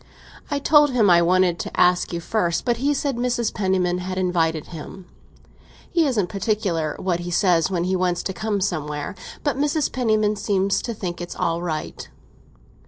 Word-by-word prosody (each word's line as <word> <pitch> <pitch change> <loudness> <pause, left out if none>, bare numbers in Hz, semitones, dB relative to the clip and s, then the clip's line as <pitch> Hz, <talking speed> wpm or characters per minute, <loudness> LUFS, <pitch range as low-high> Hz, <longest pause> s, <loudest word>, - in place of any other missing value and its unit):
I 285 - 0
told 295 +1 +5
him 215 -6 +4
I 170 0 +6
wanted 180 0 +2
to - - -5
ask 180 0 +3
you 170 - -3
first, 175 -3 -1
but 240 -2 +1
he 275 +4 +1
said 280 -3 -1
Mrs. 240 -2 0
Penniman 185 -2 0
had 185 +1 -4
invited 165 -4 0
him. 170 +4 -9 0.9
He 335 -3 +3
isn't 225 -8 +1
particular 190 -6 -1
what 180 -2 -1
he 175 0 -5
says 175 -2 +2
when 175 -3 -1
he 185 +1 0
wants 180 -1 0
to 190 - -3
come 205 +1 -2
somewhere! 150 -4 -2 0.3
But 290 -2 0
Mrs. 295 0 +1
Penniman 215 -4 +1
seems 195 -1 +1
to 235 - -4
think 175 -4 -5
it's 175 - -6
all 170 -1 -1
right." 160 -3 -5
185 Hz, 175 wpm, -22 LUFS, 175-220 Hz, 0.9 s, I